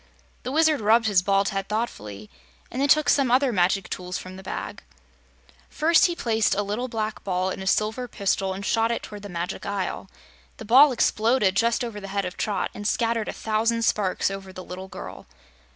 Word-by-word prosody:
The 255 - -5
Wizard 315 -2 +3
rubbed 225 +2 +4
his 200 -4 +3
bald 195 +1 +2
head 195 0 -4
thoughtfully 105 - -4 0.4
and 255 - -3
then 285 - +1
took 305 +1 +4
some 275 -3 +3
other 255 +1 +3
magic 185 0 +1
tools 180 0 -5
from 185 0 -9
the 190 - -10
bag. 190 - -6 0.9
First 325 +4 +4
he 345 - -3
placed 225 -9 +1
a 205 - 0
little 210 +5 -3
black 220 -3 -4
ball 185 -1 -1
in - - -6
a 190 - -5
silver 220 +5 0
pistol 195 -3 -1
and 195 +1 -5
shot 225 0 +2
it 235 - -3
toward 210 -1 -9
the 205 - -9
Magic 175 0 -4
Isle. 195 -1 -4 0.5
The 225 - -9
ball 265 +6 +7
exploded 230 -3 +2
just 230 +3 +2
over 220 -3 -6
the 195 - -7
head 200 0 -2
of 180 - -5
Trot 205 -3 -2
and 205 0 -4
scattered 230 -1 0
a - - -2
thousand 225 +1 0
sparks 195 -3 +1
over 195 -1 -7
the 185 0 -9
little 185 +1 -8
girl. 185 - -9
210 Hz, 200 wpm, -24 LUFS, 190-235 Hz, 0.9 s, ball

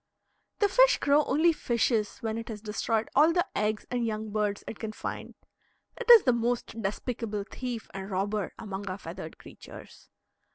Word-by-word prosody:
The 410 - +3
fish - - +5
crow 285 +2 +3
only 330 +3 +3
fishes 235 -5 0
when 220 -2 -2
it 230 0 -5
has 215 -2 -5
destroyed 220 +1 -1
all 305 +4 +6
the 350 +1 +2
eggs 215 +1 0
and 245 -1 0
young 215 -1 -3
birds 210 -1 -1
it 225 - -7
can 220 -1 -5
find. - - -6 0.6
It 485 -1 -7
is 470 -4 +10
the 250 - +4
most 235 -1 -2
despicable 210 0 -3
thief 240 +1 -6
and 195 0 -6
robber 200 +2 -1
among 200 -2 -6
our 185 - -4
feathered - - -8
creatures. - - -13
225 Hz, 170 wpm, -28 LUFS, 210-255 Hz, 0.6 s, is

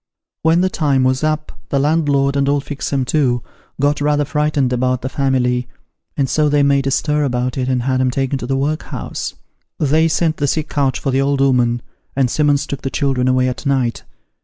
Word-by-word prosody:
When 165 +2 +3
the 185 - +2
time 140 -6 +1
was 130 +2 +1
up, 155 0 -1 0.2
the 140 - 0
landlord 140 -2 +2
and 140 0 +1
old 145 0 0
Fixem 140 -2 -2
too, 125 -4 +1 0.4
got 145 +1 +1
rather 145 0 +2
frightened 145 -3 0
about 125 0 0
the 130 - -2
family, 125 -3 0 0.5
and 140 -2 +1
so 150 +4 +2
they 145 0 +3
made 140 -1 +2
a - - +2
stir 150 +2 +1
about 125 -2 -1
it, 130 -1 -1
and 125 -2 0
had 130 0 +1
'em 130 - +2
taken 135 +1 -1
to 120 - -5
the 135 +1 0
workhouse. 150 +3 -3 0.4
They 155 +2 +3
sent 160 0 0
the 145 - 0
sick 155 +2 -1
couch 140 -3 0
for 135 - -1
the 135 +1 +2
old 140 0 +1
'ooman, 125 -3 +2 0.3
and 130 -2 +1
Simmons 150 -1 +2
took 140 -3 -5
the 135 - -3
children 130 -2 0
away 130 0 +2
at 125 - -4
night. 130 -4 0
140 Hz, 205 wpm, -18 LUFS, 130-150 Hz, 0.5 s, When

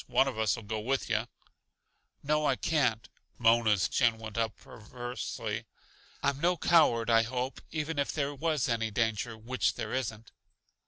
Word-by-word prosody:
One 125 +2 +3
of 135 - -3
us'll 110 +1 +1
go 110 +1 -3
with 130 +5 -1
yuh." - - +1 1.0
"No, 150 +1 +1
I 135 - +3
can't." 125 -8 0 0.3
Mona's 115 -4 +4
chin 120 -3 +2
went 110 -2 -8
up 115 -1 -1
perversely. 115 -1 -6 0.6
"I'm 140 0 0
no 175 +1 +2
coward, 135 -9 +4
I 115 0 +6
hope, 125 +3 -3
even 155 -1 -3
if 140 - 0
there 145 -1 -1
was 155 -1 0
any 115 -2 0
danger 110 +1 -1
which 125 +4 -1
there - - -4
isn't." 115 -3 -3
120 Hz, 155 wpm, -30 LUFS, 110-140 Hz, 1.0 s, I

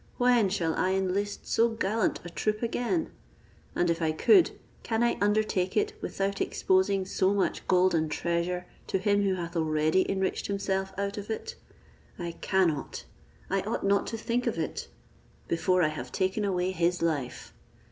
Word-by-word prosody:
When 245 -5 +4
shall 170 -4 0
I 185 +1 +1
enlist 190 +2 -1
so 230 +1 +3
gallant 225 0 0
a - - -5
troop 215 +5 -1
again? 245 +8 -1 0.6
And 175 - +2
if 170 0 0
I 160 -1 +2
could, 350 - +5 0.3
can 225 0 0
I 240 - +2
undertake 205 -3 +1
it 425 +1 +1
without 195 0 -2
exposing 190 0 +2
so 190 +1 +1
much 195 - -1
gold 185 0 +4
and 160 -1 +1
treasure 170 +2 -1 0.2
to - - 0
him 205 +1 +2
who 195 -2 +1
hath 170 -1 -5
already 155 +2 +2
enriched 190 -1 -1
himself 195 -1 -1
out 200 +1 -2
of 205 - -9
it? 455 - -4 0.6
I 170 -2 -4
cannot, 175 -7 0 0.4
I 195 0 0
ought 215 +4 -3
not 200 0 +2
to 225 - -3
think 235 +2 -1
of - - -1
it, - - -3 0.6
before 180 +2 +2
I 155 - +3
have 155 - -6
taken 190 +3 0
away 185 -1 0
his 175 -1 0
life. 145 -7 -2
190 Hz, 165 wpm, -28 LUFS, 175-205 Hz, 0.6 s, could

